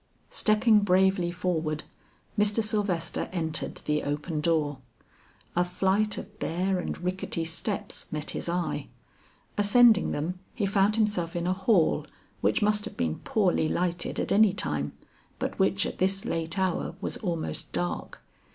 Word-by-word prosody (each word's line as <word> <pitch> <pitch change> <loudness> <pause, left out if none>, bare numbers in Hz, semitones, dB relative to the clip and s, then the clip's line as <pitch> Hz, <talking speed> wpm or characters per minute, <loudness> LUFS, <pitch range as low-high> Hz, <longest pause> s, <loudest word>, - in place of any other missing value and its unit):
Stepping 215 0 +4
bravely 190 -2 +3
forward, 165 -4 -1 0.5
Mr. 210 +2 +3
Sylvester 205 -6 -1
entered 160 -4 -2
the 150 0 +1
open 150 +2 -2
door. 150 -4 +1 0.8
A 175 - +4
flight 190 +4 +1
of 210 +1 -9
bare 185 +3 0
and - - -3
rickety 180 -2 -2
steps 190 +5 -3
met 150 -1 -1
his - - -3
eye. 175 0 -2 0.7
Ascending 220 +2 +6
them, 175 +5 -3 0.2
he 215 - 0
found 200 +1 +3
himself 205 -7 0
in 170 0 -1
a 180 - +2
hall 190 -2 +2 0.3
which - - +2
must 210 0 +3
have - - -8
been 80 -2 -1
poorly 185 -7 +1
lighted 175 -1 -1
at - - -2
any 205 -1 +5
time, 75 - -2 0.4
but - - -4
which 195 0 +3
at - - -5
this 195 +1 +1
late 165 +2 -2
hour 185 -3 0
was - - -3
almost 170 -6 -3
dark. 90 -2 -3
180 Hz, 145 wpm, -28 LUFS, 165-205 Hz, 0.8 s, Ascending